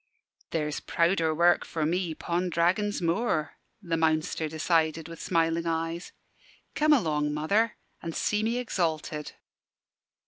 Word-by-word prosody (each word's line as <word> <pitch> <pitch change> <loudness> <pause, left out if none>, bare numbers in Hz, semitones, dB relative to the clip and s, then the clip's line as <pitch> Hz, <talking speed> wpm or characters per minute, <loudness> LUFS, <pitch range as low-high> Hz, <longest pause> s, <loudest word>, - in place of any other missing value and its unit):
"There's 150 -2 -2
prouder 170 -1 +1
work 175 +2 +4
for 160 -2 -2
me 170 0 -1
'pon 175 +3 -1
Dragon's 180 +4 +1
Moor," 165 -2 0 0.3
the 170 -2 -1
Mounster 160 0 +1
decided, 160 0 +1
with 165 0 -9
smiling 165 -1 +1
eyes. 165 +1 -2 0.6
"Come 305 0 +3
along, 150 - +2
mother, 205 +9 +1 0.2
an' 165 - -5
see 210 +5 0
me 230 +2 0
exalted." 160 -10 -2
165 Hz, 125 wpm, -28 LUFS, 160-180 Hz, 0.6 s, work